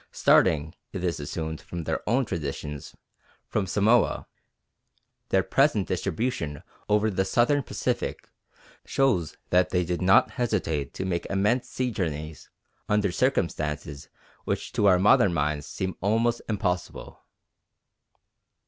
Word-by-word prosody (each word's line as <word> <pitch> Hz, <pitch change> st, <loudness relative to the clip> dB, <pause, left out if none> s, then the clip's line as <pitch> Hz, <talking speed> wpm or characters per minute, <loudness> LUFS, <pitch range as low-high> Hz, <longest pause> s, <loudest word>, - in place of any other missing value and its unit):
Starting, 80 Hz, 0 st, +3 dB, 0.2 s
it 95 Hz, -3 st, -4 dB
is 85 Hz, -3 st, -1 dB
assumed 80 Hz, +2 st, -4 dB
from 85 Hz, -1 st, -6 dB
their -, -, -2 dB
own 130 Hz, +3 st, +2 dB
traditions, 75 Hz, -5 st, -5 dB, 0.5 s
from 100 Hz, -3 st, -1 dB
Samoa, 105 Hz, +4 st, +2 dB, 1.0 s
their 95 Hz, -1 st, +3 dB
present 135 Hz, -8 st, +2 dB
distribution 90 Hz, -, -2 dB, 0.3 s
over 105 Hz, +1 st, +3 dB
the 95 Hz, 0 st, +1 dB
Southern 120 Hz, +9 st, +2 dB
Pacific -, -, -3 dB, 0.6 s
shows 110 Hz, -, 0 dB
that 90 Hz, 0 st, +4 dB
they 90 Hz, -1 st, +1 dB
did 90 Hz, +1 st, -2 dB
not 95 Hz, +1 st, +5 dB
hesitate 90 Hz, -, -2 dB
to 95 Hz, -, -3 dB
make 85 Hz, -2 st, -2 dB
immense 105 Hz, +6 st, +1 dB
sea 125 Hz, -1 st, -2 dB
journeys 80 Hz, -6 st, -4 dB, 0.4 s
under 105 Hz, -2 st, +2 dB
circumstances 75 Hz, -, -1 dB, 0.3 s
which -, -, -3 dB
to 100 Hz, -, +2 dB
our 95 Hz, -2 st, +6 dB
modern 95 Hz, -1 st, +4 dB
minds 75 Hz, -1 st, -1 dB
seem 95 Hz, -2 st, -4 dB
almost 115 Hz, +4 st, +1 dB
impossible. 90 Hz, -4 st, -3 dB
95 Hz, 120 wpm, -26 LUFS, 80-110 Hz, 1.0 s, our